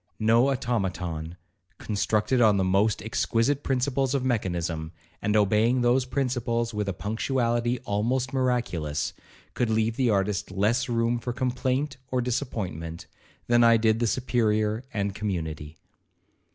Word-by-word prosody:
No 115 +4 +4
automaton, 90 -10 -2 0.4
constructed 110 +4 0
on 105 -3 +5
the 95 - +2
most 100 +3 +2
exquisite 115 +5 0
principles 135 0 0
of 130 -2 -1
mechanism, 85 -8 -2 0.3
and 105 +1 0
obeying 110 +4 +3
those 125 +2 +3
principles 120 -3 -1
with 105 -1 -2
a - - +1
punctuality 120 +4 0
almost 125 +5 -1
miraculous, 120 - -1 0.4
could 120 - 0
leave 110 +1 +1
the 130 -3 +2
artist 100 -1 0
less 110 +7 0
room 115 0 +1
for 120 +1 -4
complaint 130 +3 -1
or 130 - 0
disappointment, 105 - -3 0.4
than 120 0 +4
I 115 0 +6
did 110 0 +2
the 120 - +1
Superior 110 -2 0
and 100 -3 -2
community. 80 -7 -4
115 Hz, 130 wpm, -26 LUFS, 100-125 Hz, 0.4 s, I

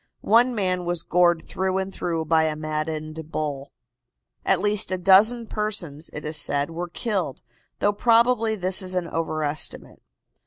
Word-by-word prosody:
One 240 +4 +4
man 185 -3 -1
was 175 -1 -1
gored 175 -1 +2
through 190 0 -1
and 190 0 -3
through 165 -3 -2
by 160 0 +3
a 155 -1 -1
maddened 155 0 -4
bull. 145 -3 -4 0.7
At - - +2
least 205 -2 +2
a 185 - 0
dozen 205 +6 +5
persons', 200 -9 -4
it 150 - -8
is 155 0 +1
said, 145 +1 +1
were 175 +2 -5
killed, 185 - -3 0.3
though 205 - +1
probably 230 0 +3
this 185 0 +1
is 185 0 -3
an 180 -2 -1
overestimate. 155 -2 -3
175 Hz, 155 wpm, -24 LUFS, 155-205 Hz, 0.7 s, dozen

